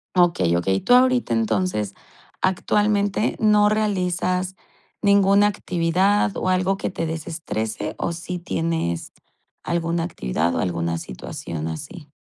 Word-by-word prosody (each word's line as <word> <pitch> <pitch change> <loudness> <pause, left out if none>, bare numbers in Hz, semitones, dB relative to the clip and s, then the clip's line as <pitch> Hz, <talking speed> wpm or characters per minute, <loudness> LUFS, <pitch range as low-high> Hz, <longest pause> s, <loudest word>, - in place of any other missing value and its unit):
Okey, 170 - +3
okey. 95 +3 +1
Tú - - +3
ahorita 250 - +4
entonces 110 - 0 0.5
actualmente, 205 +2 +1
¿no 210 -1 +5
realizas 185 -3 0 0.5
ninguna 200 0 +5
actividad 190 +2 +1
o 185 - -1
algo 185 +1 +1
que - - -2
te 165 -3 -3
desestrese, 155 -9 -4
o - - -1
sí 175 +1 -5
tienes 165 - -2 0.5
alguna 170 0 -1
actividad 85 - -1
o - - 0
alguna 85 -2 -1
situación 80 +3 -6
así? 110 - -7
175 Hz, 120 wpm, -22 LUFS, -, 0.5 s, no